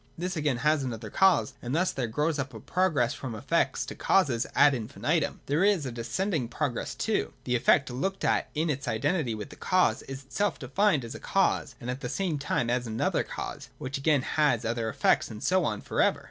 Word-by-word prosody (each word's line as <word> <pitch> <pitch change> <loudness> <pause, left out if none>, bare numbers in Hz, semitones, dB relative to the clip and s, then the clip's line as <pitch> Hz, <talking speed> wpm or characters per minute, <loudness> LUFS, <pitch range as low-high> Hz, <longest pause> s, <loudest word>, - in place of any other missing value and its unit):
This 180 +2 -3
again 150 -5 0
has 150 +2 +2
another 115 -4 -5
cause, 185 - +3
and 125 +3 -3
thus 180 +3 +2
there 125 -3 -2
grows 150 +6 0
up 135 -1 -4
a - - -7
progress 160 -9 +1
from 130 -5 -6
effects 140 +9 0
to - - -6
causes 135 -11 +2
ad 145 - +6
infinitum. 140 +6 -1
There 150 +6 +1
is 200 -7 +3
a 130 - -3
descending 120 - -2
progress 120 +1 -3
too: - - -1
the 125 - 0
effect, 130 +4 +4
looked 190 +11 -2
at - - +1
in 155 +1 +1
its 140 0 -4
identity 155 -11 0
with 105 -2 -7
the - - -10
cause, 180 -11 +2
is 135 0 -8
itself 190 +6 -1
defined 145 - +1
as 115 - -7
a - - -8
cause, 190 -8 +1
and 120 - -8
at 130 +2 -6
the 125 - -4
same 170 -1 -1
time 130 -3 0
as 120 0 0
another 110 0 0
cause, - - -6
which 135 +1 -4
again 145 -2 +2
has 140 -8 +1
other 115 0 -1
effects, - - +2
and 110 -2 -8
so 185 -2 +2
on 105 -2 -2
for - - -1
ever. - - +3
140 Hz, 215 wpm, -28 LUFS, 120-165 Hz, -, ad